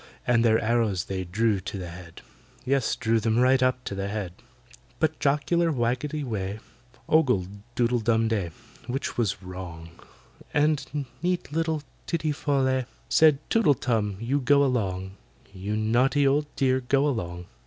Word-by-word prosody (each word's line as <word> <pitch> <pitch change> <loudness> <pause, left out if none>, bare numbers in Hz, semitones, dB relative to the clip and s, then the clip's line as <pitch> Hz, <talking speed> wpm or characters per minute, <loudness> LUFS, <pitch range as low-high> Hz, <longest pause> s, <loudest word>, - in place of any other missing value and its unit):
And 115 -1 +3
their 110 -1 +5
arrows 110 -5 +1
they 95 -1 -3
drew 105 +3 +1
to 95 +2 -6
the 90 -2 -6
head— 85 -1 -11 0.4
Yes, 135 -2 +1
drew 115 -1 +1
them 110 +1 +1
right 130 +1 +4
up 130 0 +1
to - - -5
the 100 0 -3
head. 100 -4 -4 0.7
But 160 0 0
jocular 155 +4 +2
WAGGETY 130 +4 -1
WEH 105 -5 -3 0.5
Ogled 125 - +3 0.3
DOODLE 120 0 +2
DUM 115 0 +2
DEY 100 -6 -1 0.4
(which 130 +2 -3
was 105 -5 -1
wrong), 90 -3 -8 0.7
And 150 -1 +1 0.2
neat 180 -4 -1
little 160 -2 0 0.2
TITTY 160 -3 0
FOL 145 -2 0
LEH 130 -1 +1 0.2
Said, 155 -3 +5
"TOOTLE 175 -11 +4
TUM, 110 -5 -1
you 125 +6 0
go 140 +2 +4
along! 95 -6 -2 0.4
You 100 +3 -3
naughty 125 +6 +2
old 145 +2 +2
dear, 130 -1 +2
go 135 +3 +2
along!" 90 -9 -3
120 Hz, 155 wpm, -26 LUFS, 100-140 Hz, 0.7 s, their